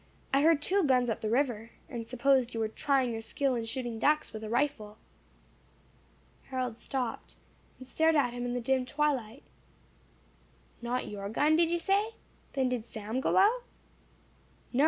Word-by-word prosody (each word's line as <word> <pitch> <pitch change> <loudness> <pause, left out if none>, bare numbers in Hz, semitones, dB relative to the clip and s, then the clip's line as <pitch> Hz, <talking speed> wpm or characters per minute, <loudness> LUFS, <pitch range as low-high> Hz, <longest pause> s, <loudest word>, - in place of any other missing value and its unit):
I 275 - +5
heard 310 -1 +4
two 390 +3 +2
guns 250 -4 +3
up - - -4
the 215 - -1
river, 235 -3 0 0.2
and 230 -2 -6
supposed 255 0 +2
you - - -2
were 220 - +1
trying 265 +1 +1
your 225 -1 -4
skill 265 +4 -1
in 230 -2 -2
shooting 240 -1 -4
ducks 300 +6 +2
with 220 0 -6
a 215 - -5
rifle." 235 -4 -1 1.5
Harold 255 -3 -3
stopped, 250 -4 -4 0.4
and 260 - -12
stared 320 +4 +2
at 255 -5 +2
him 245 0 -4
in 245 0 -2
the 245 - -1
dim 260 +2 +1
twilight. 270 -4 -1 1.4
"Not 245 +1 -2
your 200 -1 -5
gun, 295 +8 +3
did 335 0 +3
you 345 - +1
say? 400 +6 +1 0.4
Then 265 -2 +1
did 250 -3 -1
Sam 220 +2 -4
go - - +1
out?" 445 +6 +5 1.1
"No. 245 - 0
255 Hz, 170 wpm, -30 LUFS, 230-290 Hz, 1.5 s, I